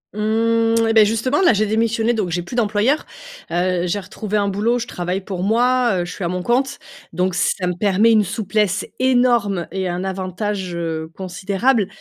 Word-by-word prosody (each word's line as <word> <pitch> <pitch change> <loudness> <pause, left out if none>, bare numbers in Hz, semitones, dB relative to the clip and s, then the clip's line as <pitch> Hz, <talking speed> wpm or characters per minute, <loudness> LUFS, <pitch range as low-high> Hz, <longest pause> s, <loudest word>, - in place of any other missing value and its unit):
Mmh 225 +1 +1
et 225 - +2
beh 220 -1 +7
justement 230 - 0
là 350 - +5
j'ai 215 +1 +1
démissionné! 225 +2 +1
Donc 210 -6 -1
j'ai 175 +1 -1
plus 235 - -8
d'employeur. 225 +5 +1 0.5
Heu, 180 0 0
j'ai 205 +4 -1
retrouvé 210 +2 -4
un 200 - +1
boulot, 210 +5 0
je 235 - -3
travaille 180 -3 -3
pour 185 -2 -5
moi, 240 -2 +2
heu, - - -3
je 175 - -7
suis 195 - -6
à - - 0
mon 180 +1 -3
compte. 265 +5 0 0.4
Donc 185 0 0
ça 180 +2 0
me 180 - 0
permet 205 +2 +3
une 215 -2 +4
souplesse 205 0 -1
énorme 240 -8 +2
et 190 -1 -2
un 175 +1 -3
avantage, 190 0 -3
heu, 160 -2 -3
considérable. 195 +4 0
205 Hz, 190 wpm, -20 LUFS, 185-230 Hz, 0.5 s, beh